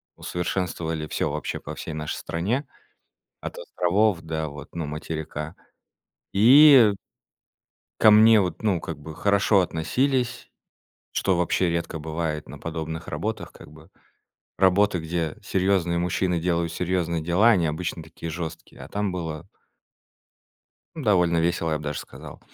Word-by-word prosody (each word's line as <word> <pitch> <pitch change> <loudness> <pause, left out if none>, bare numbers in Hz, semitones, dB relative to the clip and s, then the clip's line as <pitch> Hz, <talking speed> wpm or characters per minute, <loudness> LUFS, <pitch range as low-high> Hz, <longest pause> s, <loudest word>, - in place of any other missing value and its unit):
усовершенствовали 85 -3 -3
всё 75 - -1
вообще 75 -1 -4
по - - -8
всей 80 - -6
нашей 75 -1 -4
стране. 110 - -2 0.8
От - - -6
островов 95 +1 +1
до 80 -1 -3
вот, 70 0 -10
ну, 85 -2 -3
материка. 75 +1 -5 0.8
И 125 +1 +8 1.1
ко 110 - +8
мне 110 0 +7
вот, 90 -2 -3
ну, 100 -7 +1
как - - -6
бы, 75 +1 -9
хорошо 100 +2 +3
относились, 125 - -1 0.6
что 95 -2 +1
вообще 90 +1 +1
редко 85 -1 -3
бывает 80 0 -4
на 75 +3 -9
подобных 80 +1 -5
работах, - - -4
как - - -14
бы. 80 +3 -16 0.7
Работа, 95 0 +3
где 80 -1 -3
серьезные 95 -3 +1
мужчины 90 0 0
делают 85 -1 0
серьезные 85 -2 -1
дела- 90 +8 +4
они 90 -7 +3
обычно 80 +2 -3
такие 80 +1 -8
жёсткие, 80 0 -7
а - - -9
там 100 -2 -2
было 80 -4 -5 1.5
н 155 - -7
довольно 90 -6 +3
весело, 85 0 0
я 80 - +1
б - - -10
даже 75 0 -3
сказал. - - -11
85 Hz, 140 wpm, -25 LUFS, 80-95 Hz, 1.5 s, И